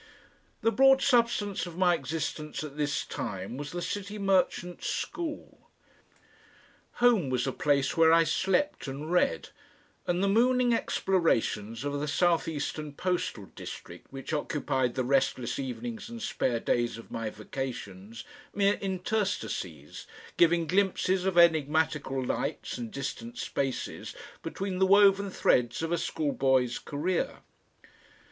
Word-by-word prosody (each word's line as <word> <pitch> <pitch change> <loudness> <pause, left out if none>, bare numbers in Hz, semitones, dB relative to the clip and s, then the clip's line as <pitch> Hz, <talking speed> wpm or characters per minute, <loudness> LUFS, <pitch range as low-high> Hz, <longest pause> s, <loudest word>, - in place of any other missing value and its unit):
The 225 - +4
broad 270 +2 +6
substance 230 -7 +2
of 170 -1 -9
my 180 -1 +4
existence 155 0 -3
at 145 -2 -7
this 150 0 -1
time 95 +3 -5
was 145 +2 -6
the 175 0 -4
City 205 +2 -4
Merchants 185 -3 0
School. 325 -4 -5 1.2
Home 235 - +3
was 125 -1 0
a 135 - 0
place 140 -1 +1
where 165 -1 +6
I 165 0 +6
slept 195 - 0
and 145 +4 -5
read, 175 - +1 0.6
and 175 +2 +1
the - - +3
mooning 245 +3 +3
explorations 120 - 0
of 145 0 -2
the 150 - -2
south 170 +3 +2
eastern 150 -1 -4
postal 175 - -2
district - - -9
which 135 +3 -6
occupied 130 -4 -1
the 130 - 0
restless 130 -2 0
evenings 120 - -5
and 235 0 -7
spare 125 - -1
days 120 0 0
of 115 - -12
my 115 -1 -3
vacations 110 -2 -6 0.3
mere 200 0 +2
interstices, 195 +2 -3 0.3
giving 170 0 +4
glimpses 185 +1 +1
of 190 -2 0
enigmatical 155 -4 +3
lights - - -3
and 120 -2 -5
distant 140 - -6
spaces 135 -2 -3 0.3
between 190 -1 -4
the 190 - +4
woven 200 0 +5
threads 125 -6 +1
of 165 - -2
a 175 - +2
school 150 -3 -1
boy's 130 -3 +2
career. 180 - -2
160 Hz, 135 wpm, -29 LUFS, 130-195 Hz, 1.2 s, broad